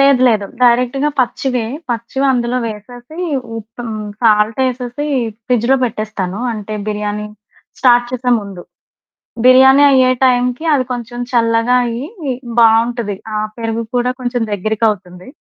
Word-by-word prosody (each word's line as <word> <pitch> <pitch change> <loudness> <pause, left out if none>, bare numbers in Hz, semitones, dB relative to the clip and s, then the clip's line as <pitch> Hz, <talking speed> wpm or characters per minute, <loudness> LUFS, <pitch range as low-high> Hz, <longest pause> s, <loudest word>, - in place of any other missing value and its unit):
లేదు, 275 -2 +5
లేదు. 215 -4 +1 0.2
డైరెక్ట్‌గా 250 +4 +3
పచ్చివే. 250 -1 -1 0.3
పచ్చివందులో 245 +1 0
వేసేసి, 240 +6 -9 0.4
ఉప్ 225 +2 -10
హ్మ్, 215 -2 -5 0.2
సాల్ట్ 215 0 +3
ఏసేసి 250 +3 -4 0.4
ఫ్రిడ్జ్‌లో 250 +2 +2
పెట్టేస్తాను. 215 -4 -4
అంటే, 215 -1 -6
బిర్యానీ 210 0 -3 0.5
స్టార్ట్ 245 -2 +4
చేసే 250 0 -1
ముందు. 195 -3 -9 0.8
బిర్యానీ 265 +2 +7
అయ్యే 260 -1 +4
టైంకి, 250 +2 +1
అవి 270 -3 +2
కొంచెం 240 0 -6
చల్లగా 230 0 +2
అయ్యి 235 +3 -4 0.5
బావుంటది. 230 -1 +3 0.2
ఆహ్, 215 0 -2
పెరుగు 225 0 -2
కూడా 245 0 +1
కొంచెం 245 -1 -2
దగ్గరికవుతుంది. 205 -3 -2
235 Hz, 115 wpm, -16 LUFS, 215-250 Hz, 0.8 s, బిర్యానీ